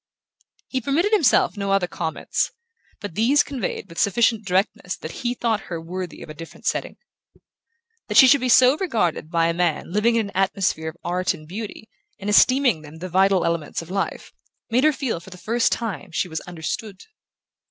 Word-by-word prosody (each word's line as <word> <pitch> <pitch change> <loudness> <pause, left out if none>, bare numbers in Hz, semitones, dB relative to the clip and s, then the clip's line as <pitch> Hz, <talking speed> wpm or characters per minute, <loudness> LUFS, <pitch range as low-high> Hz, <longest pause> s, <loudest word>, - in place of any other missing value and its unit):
He 260 - -2
permitted 310 - +1
himself 330 - +4
no 200 -1 -2
other 195 -2 +3
comments, 160 -2 -2 0.5
but 205 -5 -6
these 245 - +3
conveyed 250 -8 -4
with 165 -2 -8
sufficient 225 +2 +2
directness 185 0 0
that 155 - -7
he 245 0 -1
thought 225 -4 -1
her 170 -2 -3
worthy 180 +2 -6
of - - -12
a - - -7
different 165 +2 -12
setting. - - -2 1.1
That - - 0
she 265 - +10
should 280 +1 +5
be 255 - 0
so 255 +2 +6
regarded 210 - -1
by 165 -1 +2
a 165 - +1
man 170 -2 -1
living 225 +3 +3
in 220 -3 0
an - - -27
atmosphere 190 -4 0
of 160 - -13
art 180 +1 0
and 155 -2 -14
beauty, 215 +4 -7 0.3
and 205 +1 -3
esteeming 255 - +4
them 150 +1 -12
the 185 +3 -6
vital 190 +1 +3
elements 170 -1 -2
of 165 - -12
life, 195 0 -3 0.4
made 250 +5 +3
her 310 - +6
feel 270 - -3
for 175 - -14
the 180 - -11
first 230 +5 +1
time 210 - -3
that 170 -4 -14
she - - 0
was 160 -2 -4
understood. 185 +4 -5
195 Hz, 195 wpm, -23 LUFS, 170-235 Hz, 1.1 s, she